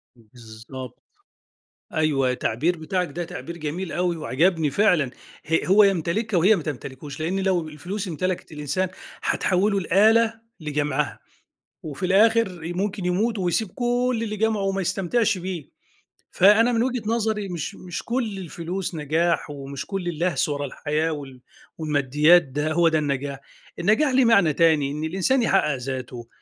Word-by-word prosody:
بالضبط، 115 +2 -11 0.9
أيوه، 140 -5 +2
التعبير 140 +8 0
بتاعك 180 +3 -2
ده 175 +4 -4
تعبير 170 +1 -7
جميل 165 +4 -4
أوي 175 -1 0
وعجَبني 160 +2 +1
فعلًا. 160 -8 +2 0.3
ه 165 +1 +1
هو 200 +3 +6
يمتلِكها 195 +2 +1
وهي 195 +6 +5
ما 170 - -4
تمتلِكوش، 140 0 -7
لإن 175 +5 -1
لو 185 -4 0
الفلوس 185 +7 -5
امتلَكِت 180 +1 -3
الإنسان 150 +5 -2 0.3
هتحوِّله 195 +2 +1
لآلة 220 +5 +4 0.3
لجَمعها، 150 -1 -2 0.6
وفي 155 +4 -4
الآخِر 195 -4 +2
ممكن 195 0 -2
يمُوت 215 +5 0
ويسيب 185 +3 0
كل 245 -1 0
اللي 215 -2 -3
جمَعه 220 -1 +1
وما 195 0 0
يستمتِعش 195 +4 0
بيه. 175 -5 -6 0.6
فأنا 215 +6 +5
من 230 0 +2
وجهة 250 -2 -1
نظري، 215 -2 -1
مش 170 -4 -5
مش 180 -1 -7
كل 230 -5 -2
الفلوس 175 +1 -5
نجاح، 160 +3 0
ومش 140 -1 -6
كل 195 -3 -4
اللَهْس 170 -3 0
ورا 145 -1 -2
الحياة 155 +4 -2
وال 135 -4 -8 0.4
والماديات 150 +2 +4
ده 145 +3 -3
هو 170 0 +4
ده 160 -1 +2
النجاح، 140 -1 -2 0.4
النجاح 220 - +3
ليه 255 -1 +4
معنى 200 -10 +4
تاني، 155 -4 +3
إن 150 +2 -4
الإنسان 190 +10 +1
يحقِّق 170 -9 +2
ذاته، 125 -2 -6
175 Hz, 145 wpm, -24 LUFS, 150-200 Hz, 0.9 s, هو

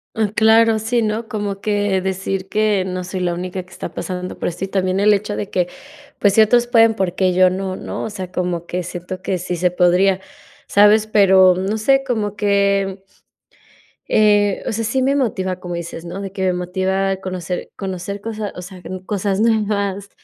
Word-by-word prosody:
Ah, 215 -2 +1
claro, 225 0 +5
sí, 230 +2 0
¿no? 220 +1 -2
como 205 -4 -4
que 205 -2 0
decir 190 0 -3
que 210 -1 +1
no 185 -1 -4
soy 185 +1 -5
la 175 -1 0
única 180 +1 -5
que 185 - -23
está - - -7
pasando 180 -1 -5
por - - -2
esto. 175 +1 -4
Y 195 - -1
también 190 0 0
el 210 +1 +5
hecho 205 +1 0
de 205 - -4
que, 180 -1 0 0.5
pues, 200 -1 +3
ciertos 235 +2 +5
pueden 225 -2 +5
porque 185 -2 0
yo 185 0 +5
no, 190 0 -3
¿no? - - -5
O - - -3
sea, 185 -3 -6
como 175 -2 -2
que 180 0 -3
siento 180 +2 -7
que 185 -2 -1
sí 180 0 -3
se 180 +1 +1
podría, 185 +2 +3 0.5
¿sabes? 210 +1 +5
pero 190 -3 +5
no 195 +4 -1
sé, 270 +5 +3
como 215 -5 -2
que. 200 -2 +1 1.1
Eh, 205 -2 +3
o - - 0
sea, 225 +2 -2
sí 250 +4 0
me 275 +2 +2
motiva, 190 -8 -1
como 175 -1 -5
dices, 170 -1 -6
¿no? 175 +3 -6
De 195 -1 -6
que 190 - -3
me 185 - +2
motiva 190 +2 -1
conocer 185 -2 -5
conocer 195 +1 -5
cosas 215 -1 -5
o 180 - -7
sea, 180 0 -11 0.2
cosas 200 -1 -1
nuevas, 205 -3 0
195 Hz, 195 wpm, -19 LUFS, 185-210 Hz, 1.1 s, claro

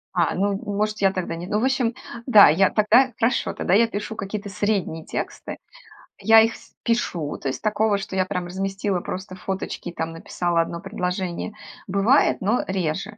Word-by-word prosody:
А, - - +2
ну, 200 +2 +1
н 195 - -3 0.2
может, 215 0 -1
я 195 -1 +4
тогда 180 -3 -3
не 175 +2 -7
ну, 210 +1 0
в - - -1
общем, 255 -3 +1 0.3
да, 215 -5 +9
я 185 +5 +4
тогда 235 +5 +4
хорошо, 240 +2 +1
тогда 180 - -1
я 230 +3 +5
пишу 215 +1 -5
какие-то 200 0 -5
средние 195 -6 -1
тексты, - - -5 0.6
я 220 +2 +7
их 225 +1 +2
в - - -17
пишу, 180 -10 -1
то 140 - -5
есть 130 - -3
такого, 215 -1 +1
что 195 -1 -6
я 185 - +2
прям 180 -1 -3
разместила 195 +1 -2
просто 185 +1 -6
фоточки 190 -1 -5
и 175 - -9
там 160 -1 -3
написала 170 +1 -1
1 170 +1 -4
предложение. 185 0 -3 0.3
Бывает, 200 +8 +3
но 215 +6 +1
реже. 190 +3 -2
195 Hz, 185 wpm, -23 LUFS, 180-215 Hz, 0.6 s, да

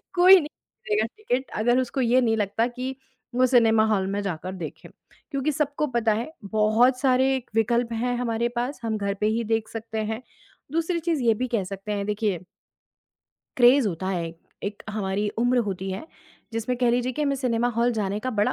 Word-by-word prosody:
कोई 370 +2 +8
नहीं 295 - -4 0.7
टिकट 265 - -2
अगर 240 +3 +3
उसको 260 +1 -1
ये 250 +1 +4
नहीं 225 -2 +2
लगता 210 +3 +1
कि 255 +2 -5 0.4
वो 255 +1 +5
सिनेमा 225 -3 +4
हॉल 195 -3 +1
में 205 +1 -1
जाकर 185 -1 -4
देखें। 165 -4 -8 0.4
क्योंकि 275 +2 0
सबको 295 +1 -1
पता 235 -3 +1
है 235 +9 -3 0.2
बहुत 220 +4 +3
सारे 265 0 +3 0.2
विकल्प 235 +1 +1
हैं 245 +2 -1
हमारे 235 -1 0
पास, 250 +4 -2
हम 220 -1 -1
घर 200 -1 -1
पे 210 +2 -1
ही 230 +2 0
देख 225 0 0
सकते 225 -1 -5
हैं। 220 +3 -4 0.5
दूसरी 330 +2 0
चीज़ 325 -4 -1
ये 230 -2 +5
भी 255 +4 -2
कह 225 -5 0
सकते 195 +2 -6
हैं, 200 -1 -1
देखिए 210 -3 0 1.2
क्रेज़ 250 0 +6
होता 185 +1 -4
है 175 -3 -1
एक 165 0 -10 0.3
एक 205 +1 -5
हमारी 205 0 -1
उम्र 245 +2 +3
होती 190 -1 -3
है 195 +12 -5 0.5
जिसमें 230 +2 -2
कह 245 -1 +3
लीजिए 245 +1 0
कि 300 - -2
हमें 280 -1 +1
सिनेमा 245 -2 0
हॉल 240 +1 +3
जाने 205 -2 -1
का 255 +3 -2
बड़ा 210 -2 +1
230 Hz, 190 wpm, -25 LUFS, 210-255 Hz, 1.2 s, कोई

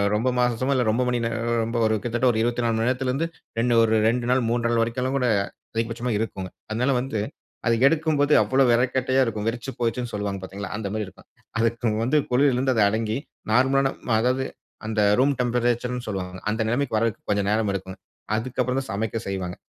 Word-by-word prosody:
ரொம்ப 115 +4 +1
மாசமோ, 125 +2 +1
இல்லை 125 -2 +2
ரொம்ப 115 +4 +1
மணி 125 0 +1
நேரம் 115 0 0
ரொம்ப 115 +1 -2
ஒரு 110 0 +2
கிட்டத்தட்ட 120 +1 +1
ஒரு 110 - -2
24 120 0 0
மணி 115 +1 +1
நேரத்திலேருந்து, 130 +5 0 0.3
2 120 +1 +2
ஒரு 110 -1 +3
2 120 +1 0
நாள் 130 +1 +3
3 120 0 +1
நாள் 115 -1 +2
வரைக்குலாம் 125 +3 -1
கூட 125 -2 +1 0.5
அதிகபட்சமா 115 +2 -2
இருக்கும்ங்க. 95 -4 -4 0.2
அதனால 125 +5 +1
வந்து 125 -4 -3 0.5
அது 115 - +4
எடுக்கும் 160 0 +1
போது 145 +1 +3
அவ்வளவு 130 -1 +3
விறகுக்கட்டையாக 130 +2 +2
இருக்கும். 110 -2 -3
வெறச்சு 120 +3 -3
போச்சுன்னு 120 0 -1
சொல்லுவாங்க 100 -1 -2
பார்த்தீங்களா? 95 +1 -7
அந்த 110 -2 -4
மாதிரி 110 -1 -2
இருக்கும். - - -16 0.3
அதுக்கு 115 0 +1
வந்து 130 +6 +2
குளிரில 130 +1 +3
இருந்து 130 +1 +2
அது 110 - +3
அடங்கி, 110 +1 -1 0.3
நார்மலான, 135 +3 +3 0.3
அதாவது 130 +2 +1 0.4
அந்த 110 -1 0 0.2
ரூம் 140 +2 +4
டெம்பரேச்சர் 120 0 0
ன்னு 125 0 -5
சொல்வாங்க. 95 -3 -4
அந்த 110 +1 -1
நிலைமைக்கு 120 +1 0
வர்றதுக்கு 115 -1 -1
கொஞ்சம் 100 -1 +1
நேரம் 105 0 +1
எடுக்குங்க. 95 -1 -5 0.4
அதுக்கப்பறம் 125 +3 -1
தான் 135 - -7
சமைக்க 110 +3 -2
செய்வாங்க. 95 -2 -3
120 Hz, 185 wpm, -24 LUFS, 110-125 Hz, 0.5 s, அது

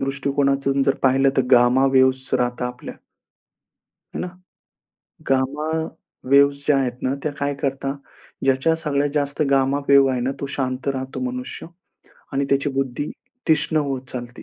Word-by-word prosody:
दृष्टिकोनातून 140 0 0
जर 135 0 +2
पाहिलं 135 +1 +4
तर, 135 - +4
गामा 125 +2 +5
वेव्हज 130 0 +3
राहतात 125 0 0
आपल्या 125 0 -8 1.2
आहे - - -3
ना? - - -2 1.0
गामा 135 +3 0 0.6
वेव्ह्ज 140 0 +5
ज्या 145 -2 +4
आहेत 130 -2 0
ना, 130 - +1
त्या 150 - -1
काय 145 0 0
करतात, 135 -1 -2 0.5
ज्याच्या 135 +4 +2
सगळ्यात 145 -3 -1
जास्त 145 0 -1
गामा 135 0 +2
वेव्ह 140 -1 +6
आहे 130 - -1
ना, 130 +2 0
तो - - -3
शांत 130 0 -3
राहतो 130 -1 -3
मनुष्य 255 0 -6 0.7
आणि 140 +1 0
त्याची 140 +1 +2
बुद्धी 135 +1 -2 0.4
तीक्ष्ण 160 0 +3
होत 135 -2 -2
चालते. 120 -1 -7
135 Hz, 145 wpm, -22 LUFS, 130-140 Hz, 1.2 s, वेव्ह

